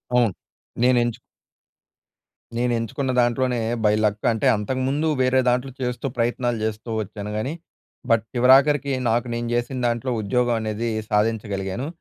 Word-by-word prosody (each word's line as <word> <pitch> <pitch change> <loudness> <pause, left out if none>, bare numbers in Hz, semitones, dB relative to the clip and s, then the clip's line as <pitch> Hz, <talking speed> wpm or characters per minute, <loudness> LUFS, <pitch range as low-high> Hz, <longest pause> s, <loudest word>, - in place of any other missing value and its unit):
అవును. 120 -4 +4 0.5
నేను 125 0 +4
ఎంచు 120 -2 -3 1.4
నేను 120 +1 +1
ఎంచుకున్న 120 +4 -2
దాంట్లోనే 120 +1 +1 0.2
బై 105 - +4
లక్ 105 0 0
అంటే, 110 -2 0
అంతకుముందు 130 +8 -1
వేరే 130 +1 +3
దాంట్లో 125 +2 0
చేస్తూ, 125 +1 -3
ప్రయత్నాలు 120 0 0
చేస్తూ 110 +2 -3
వచ్చాను. 105 0 -6
కానీ, 130 +8 -2 0.6
బట్ 115 -1 +3
చివరాఖరికి 135 +3 +4 0.2
నాకు 120 +2 +1
నేను 120 0 -3
చేసిన 120 +2 -1
దాంట్లో, 120 +2 -1
ఉద్యోగం 120 +3 +1
అనేది 110 +2 -2 0.2
సాధించగలిగాను. 105 +1 -1
120 Hz, 130 wpm, -23 LUFS, 110-130 Hz, 1.4 s, అవును